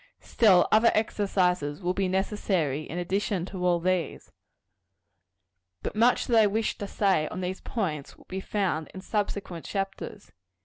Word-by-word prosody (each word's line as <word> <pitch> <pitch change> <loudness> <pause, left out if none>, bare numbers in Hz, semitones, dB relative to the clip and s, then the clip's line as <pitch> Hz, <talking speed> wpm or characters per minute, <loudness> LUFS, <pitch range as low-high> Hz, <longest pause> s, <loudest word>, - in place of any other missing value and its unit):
Still, 200 -6 +4
other 220 +2 +6
exercises 180 -8 0
will 180 -1 -1
be 195 0 0
necessary, 185 -6 -1
in 170 - -5
addition 185 +1 -1
to 185 -1 -6
all 175 -1 +3
these. 180 -2 -2 1.5
But - - -4
much 235 +3 +3
that 235 -3 +4
I 210 - +5
wish 220 +2 -1
to 205 - -4
say 190 -7 +1
on 185 - -5
these 185 +1 -4
points 160 - -3
will - - -19
be 190 - -4
found 190 -7 -1
in 190 - -6
subsequent 200 -5 -3
chapters. 195 +1 -5
190 Hz, 150 wpm, -27 LUFS, 175-205 Hz, 1.5 s, other